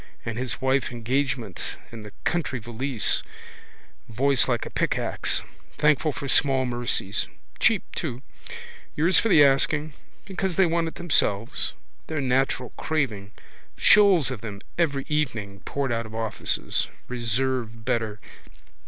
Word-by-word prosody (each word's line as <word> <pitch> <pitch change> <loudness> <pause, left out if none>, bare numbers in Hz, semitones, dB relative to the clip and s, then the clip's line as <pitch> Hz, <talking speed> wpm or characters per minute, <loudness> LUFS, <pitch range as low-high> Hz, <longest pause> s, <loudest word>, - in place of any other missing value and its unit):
And 115 - -3
his 125 +1 -3
wife 130 0 +1
engagement 120 -3 -2
in 115 -2 -8
the 105 -1 -10
country 170 -7 0
valise, 120 +1 0 0.9
voice 135 +3 +2
like 120 -3 0
a - - -7
pickaxe. - - 0 0.3
Thankful 150 +1 +3
for 140 - -6
small 135 -1 +3
mercies. 120 -5 -1 0.3
Cheap - - +3
too. 125 +3 -4 0.7
Yours 170 +4 +4
for 225 - +1
the 155 -7 +7
asking. 145 +2 +2 0.3
Because 190 -2 -2
they 190 - +5
want 165 0 +1
it 160 - -6
themselves. 115 -10 0 0.3
Their 155 - -2
natural 130 -1 0
craving. 115 -11 -2 0.5
Shoals 190 -10 +6
of 120 -5 -5
them 105 -3 -7
every 140 -5 0
evening 115 -10 -2
poured 140 -3 -2
out 115 -1 -1
of 110 - -10
offices. 110 -1 0 0.2
Reserve 120 -1 -2
better. 115 -4 -1
130 Hz, 130 wpm, -25 LUFS, 115-150 Hz, 0.9 s, the